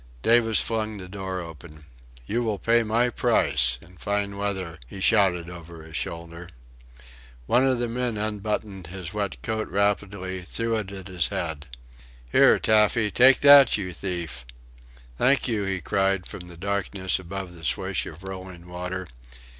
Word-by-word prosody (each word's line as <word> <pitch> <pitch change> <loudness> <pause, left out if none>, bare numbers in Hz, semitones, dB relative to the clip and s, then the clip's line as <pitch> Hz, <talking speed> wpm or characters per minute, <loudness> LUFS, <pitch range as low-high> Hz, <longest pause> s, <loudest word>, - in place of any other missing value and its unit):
Davis 115 -1 +4
flung 110 -2 -1
the 90 -2 -8
door 95 -1 -5
open. 80 -2 -11 0.4
"You 115 - -1
will 110 -3 -1
pay 115 +4 +3
my 115 +2 +1
price... 60 - +3
in 90 +1 -18
fine 100 0 -2
weather," 95 -5 -3
he 95 - -10
shouted 95 -5 +3
over 85 -2 -10
his 80 0 -11
shoulder. 85 +2 -5 1.0
One 125 - +3
of 130 -2 +2
the 120 0 -1
men 120 -1 -2
unbuttoned 105 -3 -3
his 90 +1 -7
wet 100 -3 -3
coat 110 -1 -2
rapidly, 100 -1 -1
threw 115 +6 -2
it 100 -3 -4
at 95 -1 -8
his 90 -4 0
head. 80 -6 -4 0.6
"Here, - - +6
Taffy 105 0 +3
take 130 +1 +6
that, 140 -4 +8
you 90 -3 -5
thief!" 85 -9 -4 0.8
"Thank 135 +2 +3
you!" 110 -4 -1
he 95 -1 -2
cried 95 -2 0
from 90 - -8
the 85 -1 -9
darkness 95 0 -1
above 95 0 -6
the 85 - -12
swish 70 - -1
of 85 - -11
rolling 95 -2 -8
water. 90 +1 -5
95 Hz, 155 wpm, -25 LUFS, 90-110 Hz, 1.0 s, that